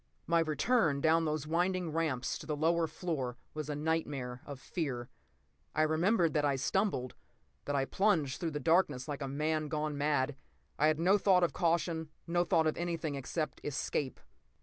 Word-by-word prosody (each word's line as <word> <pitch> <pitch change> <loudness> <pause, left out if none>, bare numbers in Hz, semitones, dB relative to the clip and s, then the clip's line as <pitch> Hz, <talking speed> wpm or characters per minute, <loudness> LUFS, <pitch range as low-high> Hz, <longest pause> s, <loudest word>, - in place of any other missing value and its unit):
p> - - -42 0.2
My 170 0 +3
return 160 - +2
down 160 +2 +3
those 155 -1 -1
winding 175 +1 0
ramps 155 -6 -1
to - - -10
the 150 - -1
lower 165 +2 +2
floor 150 -7 -3 0.2
was 155 -1 -5
a 150 - -1
nightmare 145 -5 -2
of 140 -3 -7
fear. 135 -6 -3 0.7
I 155 - +4
remember 170 +5 +3
that 150 -1 0
I 140 -2 +2
stumbled, 135 -2 0 0.5
that 145 - -1
I 135 -1 +2
plunged 165 -7 +1
through 170 - -1
the 150 -1 -3
darkness 160 -4 +2
like 145 -1 -4
a 135 - -2
man 155 +2 -1
gone 150 0 -2
mad. 145 -1 +1 0.4
I 150 - +5
had 155 0 +2
no 190 +5 +4
thought 185 -2 +4
of 175 - +2
caution, 165 -1 0 0.2
no 175 +1 +2
thought 165 -2 +2
of 155 - 0
anything 165 -3 -2
except 140 +4 -3
escape. 140 -2 -2
155 Hz, 180 wpm, -32 LUFS, 145-170 Hz, 0.7 s, I